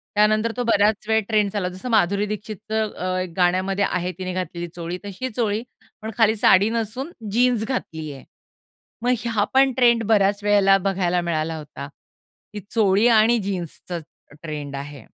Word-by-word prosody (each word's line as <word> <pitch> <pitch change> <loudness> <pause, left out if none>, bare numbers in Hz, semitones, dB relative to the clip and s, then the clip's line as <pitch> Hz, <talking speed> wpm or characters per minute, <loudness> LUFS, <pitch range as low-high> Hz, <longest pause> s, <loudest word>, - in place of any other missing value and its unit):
त्यानंतर 215 +2 +3
तो 245 - 0
बऱ्याच 210 -1 +2
वेळ 220 0 +3
ट्रेंड्स 210 -2 +1
आला. 185 -3 -1
जसं 185 +7 -7
माधुरी 200 -1 +2
दीक्षितचं 215 0 -3
अ, 185 0 -2
एक 180 -2 -6
गाण्यामध्ये 185 +2 +2
आहे 180 +1 -2
तिने 185 0 -4
घातलेली 175 -1 -4
चोळी, 170 +1 -5
तशी 205 +6 -5
चोळी, 220 -1 -1 0.4
पण 220 +1 -5
खाली 220 -1 +4
साडी 205 0 +5
नसून 230 +6 -3 0.2
जीन्स 240 -1 +2
घातली 160 - -4
आहे. 135 - -12 0.8
मग 245 - +2
ह्या 225 -4 0
पण 270 0 +5
ट्रेंड 235 -2 +4
बऱ्याच 205 -1 +3
वेळेला 200 -1 +5
बघायला 180 -2 0
मिळाला 160 -1 -2
होता. 145 -2 -9 0.7
ही 210 - -5
चोळी 210 0 +3
आणि 230 +1 +5
जीन्सचा 180 -2 -5 0.4
ट्रेंड 150 -3 -5
आहे. 140 -3 -8
205 Hz, 160 wpm, -22 LUFS, 180-220 Hz, 0.8 s, साडी